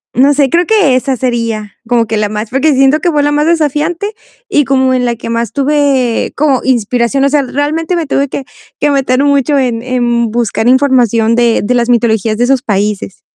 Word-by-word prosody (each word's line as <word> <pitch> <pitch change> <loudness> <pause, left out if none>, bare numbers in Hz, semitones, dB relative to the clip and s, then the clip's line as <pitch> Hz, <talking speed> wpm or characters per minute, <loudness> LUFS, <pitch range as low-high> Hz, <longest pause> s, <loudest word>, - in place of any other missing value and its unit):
no 275 +3 +4
sé, 280 -1 +1
creo 345 +4 +1
que 390 -12 +2
esa 265 +1 -1
sería 230 -4 -3
como 235 -2 +1
que 220 -1 -2
la 210 - 0
más, 210 +1 -4
porque 275 +4 +1
siento 270 +3 +3
que 345 +2 0
fue 295 -2 +1
la 290 - +1
más 295 +1 +1
desafiante 325 +5 -1 0.4
y 290 - +2
como 260 -1 +1
en 250 -1 0
la 240 -1 -1
que 230 - -8
más 230 -1 -2
tuve 280 -4 0
como 280 -3 +1
inspiración. 245 +2 0
O 275 - +3
sea, 290 0 +1
realmente 305 +6 -2
me 335 -3 -2
tuve 280 0 0
que 270 - -5 0.3
que 295 - +1
meter 270 -1 +1
mucho 285 0 +1
en 240 -3 -1
en 240 -2 -1
buscar 230 0 -1
información 245 -4 +2
de 240 -1 +2
de 245 - 0
las 240 -1 +1
mitologías 225 -2 +1
de 240 - +1
esos 265 0 +1
países. 205 -1 -2
260 Hz, 205 wpm, -12 LUFS, 235-285 Hz, 0.4 s, no